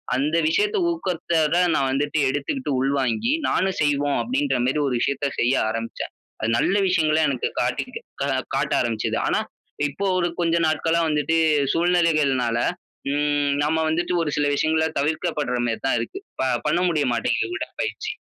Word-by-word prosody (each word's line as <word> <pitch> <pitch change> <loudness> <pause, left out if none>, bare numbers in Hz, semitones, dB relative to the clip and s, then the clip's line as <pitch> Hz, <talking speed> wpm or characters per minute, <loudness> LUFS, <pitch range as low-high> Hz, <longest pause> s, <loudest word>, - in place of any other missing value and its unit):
அந்த 145 +5 0
விஷயத்த 415 - +1
ஊக்கத்தோட 170 - 0 0.2
நான் 135 - +1
வந்துட்டு 145 +3 0
எடுத்துக்கிட்டு 145 - -2
உள்வாங்கி, 135 - 0 0.2
நானும் 190 0 0
செய்வோம் 145 -1 +1
அப்பிடின்ற 275 +4 0
மாரி 135 +4 +1
ஒரு 130 - -1
விஷயத்த 140 0 0
செய்ய 120 +2 +3 0.2
ஆரம்பிச்சேன். 115 +1 -5 0.3
அது 110 - 0
நல்ல 190 - +2
விஷயங்கள 160 -4 +2
எனக்கு 130 -3 -1
காட்டிகிருக்க - - -4
கா - - 0 0.3
காட்ட - - 0
ஆரம்பிச்சது. 115 -2 -1
ஆனா, - - +2 0.5
இப்போ 190 +8 -4
ஒரு 175 -1 +1
கொஞ்ச 170 -1 +2
நாட்களா 160 +2 +1
வந்துட்டு 150 +2 +1 0.4
சூழ்நிலைகள்னால, 155 -9 +2 0.6
ம் 145 -1 +1
நம்ம 155 +2 +1
வந்துட்டு 175 +3 0
ஒரு 150 - -2
சில 145 - +2
விஷயங்கள 160 +2 +1
தவிர்க்கப்படுற 150 -3 -1
மாரி 115 -1 -2
தான் 135 - +2
இருக்கு. 115 - -6 0.2
ப 130 - +1 0.2
பண்ண 160 +3 +2
முடிய 155 -4 +1
மாட்டேங்குது 120 - -1
உடற்பயிற்சி. - - -4
150 Hz, 150 wpm, -23 LUFS, 135-170 Hz, 0.6 s, செய்ய